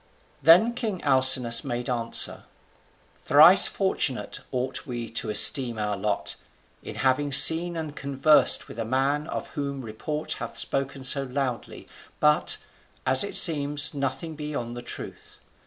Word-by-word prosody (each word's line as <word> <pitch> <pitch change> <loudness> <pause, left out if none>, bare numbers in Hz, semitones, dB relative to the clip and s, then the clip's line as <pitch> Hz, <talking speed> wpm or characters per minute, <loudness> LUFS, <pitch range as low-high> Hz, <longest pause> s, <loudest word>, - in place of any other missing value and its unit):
Then 175 - +3
king 220 -6 -6
Alcinous 130 -4 +3
made 120 0 -6
answer: 115 -2 -1 0.8
"Thrice - - +5
fortunate - - -4
ought 130 +3 -5
we 120 -2 -7
to 115 -1 -4
esteem 120 +2 +3
our 105 -1 -4
lot, 100 +1 -4 0.4
in - - -11
having 135 +2 -2
seen 165 +5 +8
and 155 -2 -8
conversed 140 +2 +1
with 115 - -12
a - - -3
man 135 +6 -3
of - - -8
whom 140 -2 -7
report 150 +8 -7
hath - - -9
spoken 135 0 -5
so 135 +2 +3
loudly, 130 -2 -7 0.3
but, 150 0 0 0.5
as 130 0 +4
it 200 - -5
seems, 145 -3 +4
nothing 140 +3 -6
beyond 145 -6 -7
the 120 - -9
truth. 120 - -10
135 Hz, 140 wpm, -23 LUFS, 120-150 Hz, 0.8 s, seen